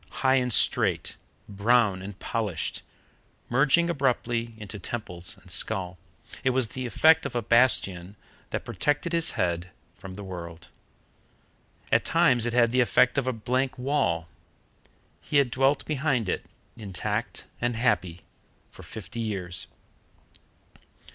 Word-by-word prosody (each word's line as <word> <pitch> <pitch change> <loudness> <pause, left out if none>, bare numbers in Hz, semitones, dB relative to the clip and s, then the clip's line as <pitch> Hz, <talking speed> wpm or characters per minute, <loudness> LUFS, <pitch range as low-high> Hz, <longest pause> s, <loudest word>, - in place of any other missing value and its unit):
High 130 0 +5
and 125 -1 0
straight, - - +2 0.3
brown 105 -1 +2
and 100 0 -8
polished, 105 -6 -3 0.7
merging 150 +7 +4
abruptly 120 -6 -1
into 105 -1 -8
temples 90 -4 -4
and 90 - -9
skull, 95 -2 -1 0.4
it 130 - +3
has 130 -4 +1
the 130 -1 -4
effect 160 +6 +5
of 140 -3 -5
a 120 - +1
bastion 100 -6 +2 0.3
that - - -4
protected 145 +4 -1
his 165 -1 +1
head 85 +1 -1 0.2
from 95 -1 -10
the 100 - -8
world. 85 -3 -8 1.2
At - - +4
times 130 -9 +3
it 120 - -2
had 120 -1 +4
the 130 +1 +3
effect 125 +2 +3
of 130 - -4
a - - +2
blank 125 +4 -1
wall. 125 - 0 0.9
He 145 - 0
had 140 -4 +3
dwelt 135 +3 +2
behind 135 -7 0
it, - - -2 0.3
intact 105 +2 -4 0.2
and 120 0 0
happy, 95 -7 0 0.5
for - - -13
fifty 110 +2 -8
years. 95 -6 -3
115 Hz, 135 wpm, -26 LUFS, 95-130 Hz, 1.2 s, High